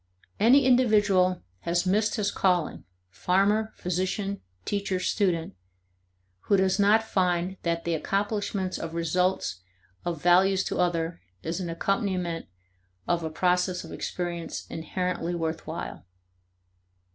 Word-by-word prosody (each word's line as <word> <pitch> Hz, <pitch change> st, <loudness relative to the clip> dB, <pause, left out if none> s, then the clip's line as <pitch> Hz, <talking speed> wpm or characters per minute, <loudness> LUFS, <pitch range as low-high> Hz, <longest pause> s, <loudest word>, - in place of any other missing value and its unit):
Any 255 Hz, +6 st, +6 dB
individual 205 Hz, -7 st, +4 dB, 0.2 s
has 175 Hz, -, 0 dB
missed 210 Hz, +3 st, +2 dB
his 205 Hz, -3 st, 0 dB
calling, 180 Hz, -, 0 dB, 0.3 s
farmer, 200 Hz, -, +2 dB
physician, 185 Hz, +3 st, -2 dB, 0.2 s
teacher, 200 Hz, -2 st, -1 dB
student, 180 Hz, -4 st, 0 dB, 0.9 s
who 200 Hz, -, +4 dB
does 190 Hz, +1 st, +2 dB
not 210 Hz, +2 st, +5 dB
find 185 Hz, -3 st, 0 dB
that 170 Hz, -1 st, -1 dB
the 170 Hz, -, -1 dB
accomplishments 200 Hz, +2 st, -1 dB
of 165 Hz, 0 st, -5 dB
results 170 Hz, -, 0 dB, 0.4 s
of 170 Hz, -3 st, -3 dB
value 185 Hz, +3 st, +4 dB
to 190 Hz, -, -1 dB
others 170 Hz, -1 st, 0 dB, 0.2 s
is 165 Hz, +3 st, -2 dB
an 180 Hz, -2 st, -3 dB
accompaniment 180 Hz, -2 st, -1 dB, 0.6 s
of 175 Hz, -1 st, +1 dB
a 160 Hz, -, -2 dB
process 180 Hz, +2 st, +1 dB
of -, -, -10 dB
experience 175 Hz, -2 st, -4 dB
inherently 175 Hz, +1 st, -2 dB
worth 160 Hz, -1 st, -3 dB
while. -, -, -6 dB
185 Hz, 120 wpm, -27 LUFS, 170-200 Hz, 0.9 s, Any